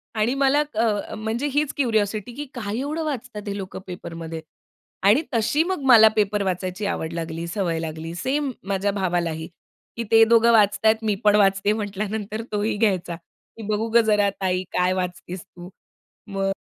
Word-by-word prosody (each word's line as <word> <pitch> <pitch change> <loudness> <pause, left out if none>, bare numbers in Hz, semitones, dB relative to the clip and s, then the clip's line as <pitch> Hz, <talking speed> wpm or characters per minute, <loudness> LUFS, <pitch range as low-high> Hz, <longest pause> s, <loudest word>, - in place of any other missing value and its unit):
आणि 220 +3 +1
मला 275 +2 +3
अ, 215 -2 0
म्हणजे 220 +6 -2
हीच 295 -1 +1
क्युरिओसिटी 220 -3 0
की 295 +2 -5
"काय 215 -3 -4
एवढं 305 +4 -2
वाचतात, 250 -7 -4
हे 200 0 -3
लोकं 190 -2 -6
पेपरमध्ये?" 165 -2 -7 0.6
आणि 215 +10 +5
तशी 235 +7 +2
मग 370 -2 -2
मला 230 -4 +8
पेपर 210 -1 +1
वाचायची 185 +1 -3
आवड 165 -4 -3
लागली 165 0 -4
सवय 170 -2 -1
लागली. 160 0 -5
सेम 270 - -1 0.2
माझ्या 200 0 0
भावालाही, 175 -4 -1 0.5
की 235 - -1
ते 225 0 +8
दोघं 230 0 +5
वाचत 210 -2 +3
आहेत 220 +1 +4
मी 210 -2 +2
पण 210 0 +6
वाचते 195 0 +3
म्हंटल्यानंतर 210 +1 -4
तोही 210 +1 0
घ्यायचा, 190 -5 0
की 175 +6 -16
"बघू 215 +1 0
गं, 235 +1 +5
जरा 210 -2 +3
ताई 185 -1 0
काय 180 +1 +2
वाचतेस 180 -1 -4
तू?" 175 0 -12 0.6
मग 195 -1 -1
205 Hz, 165 wpm, -23 LUFS, 185-225 Hz, 0.6 s, मला